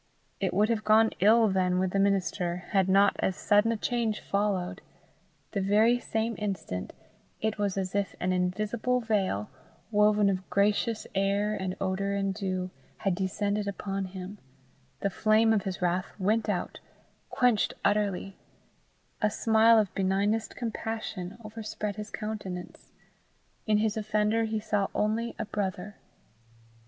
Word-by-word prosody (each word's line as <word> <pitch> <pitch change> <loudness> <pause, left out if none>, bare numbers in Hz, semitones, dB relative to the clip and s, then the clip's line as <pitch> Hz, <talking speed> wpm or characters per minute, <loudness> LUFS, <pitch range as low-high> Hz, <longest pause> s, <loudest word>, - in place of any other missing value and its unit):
It 190 -2 0
would 210 +4 +2
have 225 -2 0
gone 220 +1 +5
ill 220 +3 +6
then 185 -2 +1
with 185 0 +1
the 195 - +1
minister, 185 -3 0
had 190 -3 +2
not 200 +1 +5
as 190 - 0
sudden 210 +4 +3
a 230 - -1
change 225 -1 -1
followed; 200 -3 -1 0.7
the 200 - -1
very 215 +5 +4
same 225 0 -2
instant, 195 - -4 0.5
it 220 -1 -2
was 200 -2 0
as 185 -1 -2
if 200 -1 -1
an 185 +1 0
invisible 215 +7 0
veil, 195 - -1 0.4
woven 210 -1 +4
of 190 -1 -1
gracious 210 +3 +1
air 200 +2 +1
and 190 -2 -3
odour 195 +1 -1
and 195 -1 0
dew, 185 -2 -3 0.3
had 195 - 0
descended 200 +2 -1
upon 195 -1 -3
him; 190 +2 -8 0.6
the 200 - 0
flame 220 +3 +3
of 210 -2 0
his 190 -1 -3
wrath 180 +1 0
went 215 +3 +1
out, 190 -4 -2 0.5
quenched 245 -5 +2
utterly; 200 -2 0 0.9
a 215 - +3
smile 225 +1 +4
of 210 -3 +1
benignest 200 +3 0
compassion 220 -5 -4
overspread 215 -1 -5
his 210 0 -6
countenance; 205 -5 -6 0.8
in 215 -1 +4
his 215 +1 +1
offender 215 +1 +1
he 220 0 -2
saw 210 -2 0
only 225 +3 0
a 225 - -3
brother. 200 -1 -4
205 Hz, 145 wpm, -28 LUFS, 190-215 Hz, 0.9 s, ill